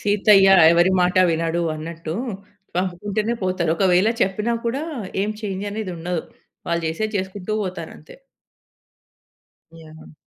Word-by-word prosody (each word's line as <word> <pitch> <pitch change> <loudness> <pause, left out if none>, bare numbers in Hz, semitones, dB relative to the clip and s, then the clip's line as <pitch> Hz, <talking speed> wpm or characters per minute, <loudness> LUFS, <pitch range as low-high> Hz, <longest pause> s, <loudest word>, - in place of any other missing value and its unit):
సీతయ్య 205 -1 +5 0.2
ఎవరి 175 +2 +4
మాట 180 +1 +1
వినడు 165 +1 -1
అన్నట్టు, 160 +1 -6 0.6
పంపుకుంటేనే 200 +5 -1
పోతారు. 185 -3 0
ఒకవేళ 185 +2 +3
చెప్పినా 210 +5 0
కూడా 260 +5 -1 0.4
ఏం 210 - -1
చేంజ్ 195 -1 -4
అనేదుండదు. 180 -5 -4 0.4
వాళ్ళు 170 0 -1
జేసేది 215 +7 -3
చేసుకుంటూ 190 +2 -5
పోతారంతే. 185 - -8 1.7
యాహ్! 160 0 -14
185 Hz, 105 wpm, -21 LUFS, 170-205 Hz, 1.7 s, సీతయ్య